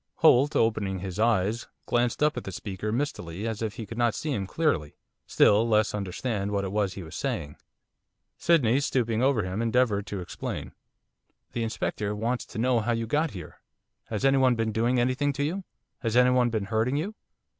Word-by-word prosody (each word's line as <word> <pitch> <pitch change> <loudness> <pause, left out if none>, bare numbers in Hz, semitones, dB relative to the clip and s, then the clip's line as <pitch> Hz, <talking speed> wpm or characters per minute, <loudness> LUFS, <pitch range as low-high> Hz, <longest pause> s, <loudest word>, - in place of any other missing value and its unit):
Holt, 140 +5 +5
opening 105 -4 +1
his 95 +1 -6
eyes, 110 0 +1 0.2
glanced 120 +3 +1
up 150 0 +3
at - - -4
the 95 - -6
speaker 100 +2 -4
mistily, 105 - -3
as 110 -1 -4
if 110 -1 -2
he 115 -3 -6
could 115 +4 -7
not 120 -2 +2
see 155 - -3
him 100 -7 -2
clearly, 95 - 0 0.3
still 110 +3 +4
less 110 -1 +3
understand 100 +1 -2
what 100 -1 -1
it 95 - -3
was 100 -2 0
that - - -15
he 95 - -6
was 80 - -10
saying. 75 0 -3 0.8
Sydney, 135 -7 +3
stooping 120 -5 0
over 130 -5 +3
him, 95 +4 -3
endeavoured 115 -3 +1
to 100 - -4
explain. 90 - -5 0.8
'The 120 - -3
Inspector 105 -2 -2
wants 115 +4 -1
to - - -9
know 125 +1 +2
how 120 +2 0
you 115 0 -1
got 150 +7 +1
here, 95 -8 -10 0.4
has 110 +3 -2
anyone 135 -2 +4
been 115 -1 0
doing 120 +3 +1
anything 130 +4 +1
to 140 +1 -2
you? 180 +6 -2 0.3
Has 115 -2 0
anyone 125 -1 +5
been 110 -3 -2
hurting 110 +5 0
you? 190 +8 -2
115 Hz, 190 wpm, -27 LUFS, 100-125 Hz, 0.8 s, Holt